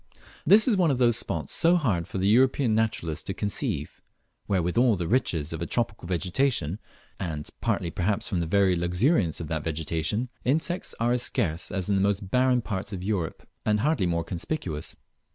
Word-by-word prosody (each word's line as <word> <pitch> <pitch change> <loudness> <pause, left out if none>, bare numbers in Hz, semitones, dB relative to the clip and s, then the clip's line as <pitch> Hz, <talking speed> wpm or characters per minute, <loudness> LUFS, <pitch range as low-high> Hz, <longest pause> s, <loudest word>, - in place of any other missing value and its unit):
This 210 - +7
is 235 - +4
one 180 -4 +3
of 135 - +1
those 120 -2 +4
spots - - -3
so 170 +2 +4
hard 105 - 0
for - - -5
the 95 +1 +1
European 130 +2 +3
naturalist 105 -8 -1
to - - -3
conceive, 100 -2 -3 0.5
where 95 -4 +1
with 90 +1 -2
all 120 -2 +4
the 85 -3 -3
riches 85 - 0
of 80 - -5
a 85 - -2
tropical 115 -7 -2
vegetation, 90 - 0 0.4
and 75 -5 -4
partly 85 - 0
perhaps 100 +6 -1
from 90 - -1
the 85 - -1
very 95 +1 +3
luxuriance 90 - +1
of 80 - -5
that 80 -2 -2
vegetation, 80 - -1
insects 160 +7 0
are 115 +1 +2
as 125 0 +2
scarce 85 -8 -1
as 95 -2 -2
in 100 - +1
the - - +2
most 100 -1 0
barren 125 -1 +3
parts 100 -1 -4
of 95 -3 -5
Europe, 95 -6 -3 0.2
and 105 -1 +1
hardly 145 - +1
more 85 -1 0
conspicuous. 85 - -4
100 Hz, 190 wpm, -26 LUFS, 85-125 Hz, 0.5 s, This